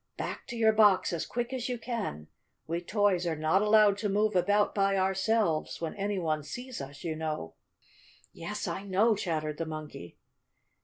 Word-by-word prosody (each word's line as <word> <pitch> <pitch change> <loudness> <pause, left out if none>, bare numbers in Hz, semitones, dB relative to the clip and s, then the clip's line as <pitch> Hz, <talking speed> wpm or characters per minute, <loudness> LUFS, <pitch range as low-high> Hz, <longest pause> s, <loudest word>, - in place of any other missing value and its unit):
"Back - - -5
to 240 - -6
your 220 -1 +4
box 210 -5 +4
as 165 -1 -2
quick 240 +2 -3
as 255 -1 -3
you 250 - -2
can. 225 - -4 0.4
We 170 +2 -2
toys 190 -2 +1
are 165 - 0
not 155 +5 +2
allowed 210 -1 +5
to 210 - -1
move 210 +1 +1
about 205 +3 +3
by 195 -1 +2
ourselves 190 -2 +1
when 165 -1 -3
any 205 0 -2
one 155 -4 0
sees 245 - -7
us, 140 +1 -9
you 165 -2 -2
know." 155 - -4 0.8
"Yes, - - -5
I - - -3
know!" 200 +3 +2
chattered 155 -5 -2
the 165 - -3
Monkey. 155 - -8
195 Hz, 175 wpm, -29 LUFS, 160-215 Hz, 0.8 s, allowed